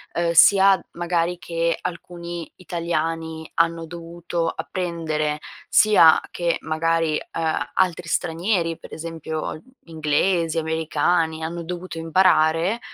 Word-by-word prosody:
uhm, 170 Hz, 0 st, +1 dB
sia 190 Hz, +4 st, +6 dB
magari 175 Hz, 0 st, -1 dB
che 170 Hz, -1 st, -1 dB
alcuni 175 Hz, -1 st, -6 dB
italiani 165 Hz, -2 st, -3 dB
hanno 165 Hz, 0 st, +1 dB
dovuto 170 Hz, 0 st, -4 dB
apprendere, 160 Hz, -4 st, -2 dB, 0.3 s
sia 200 Hz, -7 st, +6 dB
che 170 Hz, -1 st, 0 dB
magari, 160 Hz, 0 st, 0 dB
ehm, 160 Hz, -7 st, -3 dB
altri 180 Hz, -2 st, 0 dB
stranieri 170 Hz, +1 st, 0 dB
per -, -, -12 dB
esempio 160 Hz, -1 st, -5 dB
gli 155 Hz, -, -17 dB, 0.3 s
inglesi, 160 Hz, +2 st, +1 dB
americani, 160 Hz, 0 st, 0 dB
hanno 170 Hz, +1 st, -4 dB
dovuto 180 Hz, 0 st, -6 dB
imparare, 165 Hz, +3 st, +3 dB
165 Hz, 105 wpm, -22 LUFS, 160-175 Hz, 0.3 s, sia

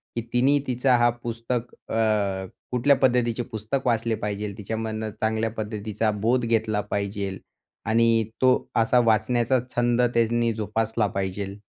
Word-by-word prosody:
की 115 Hz, -, -1 dB
तिने 135 Hz, +4 st, +4 dB
तिचा 125 Hz, +1 st, +2 dB
हा 120 Hz, 0 st, +4 dB
पुस्तक 115 Hz, +1 st, -3 dB, 0.2 s
अ, -, -, -1 dB, 0.8 s
कुठल्या 125 Hz, +3 st, +4 dB
पद्धतीचे 120 Hz, -2 st, +2 dB
पुस्तक 110 Hz, +5 st, -3 dB
वाचले 115 Hz, -1 st, +1 dB
पाहिजे? 105 Hz, -1 st, -4 dB
तिच्यामधनं 110 Hz, +1 st, -4 dB
चांगल्या 110 Hz, 0 st, 0 dB
पद्धतीचा 110 Hz, 0 st, -2 dB
बोध 115 Hz, +4 st, +1 dB
घेतला 110 Hz, -2 st, +1 dB
पाहिजे 100 Hz, -1 st, -3 dB, 0.5 s
आणि 115 Hz, 0 st, +3 dB, 0.2 s
तो 130 Hz, 0 st, +6 dB, 0.2 s
असा 115 Hz, +2 st, +4 dB
वाचण्याचा 120 Hz, +3 st, +2 dB, 0.2 s
छंद 120 Hz, 0 st, +2 dB
त्यांनी 115 Hz, 0 st, +2 dB
जोपासला 110 Hz, +1 st, -1 dB
पाहिजे? 95 Hz, 0 st, -4 dB
115 Hz, 130 wpm, -25 LUFS, 105-120 Hz, 0.8 s, तो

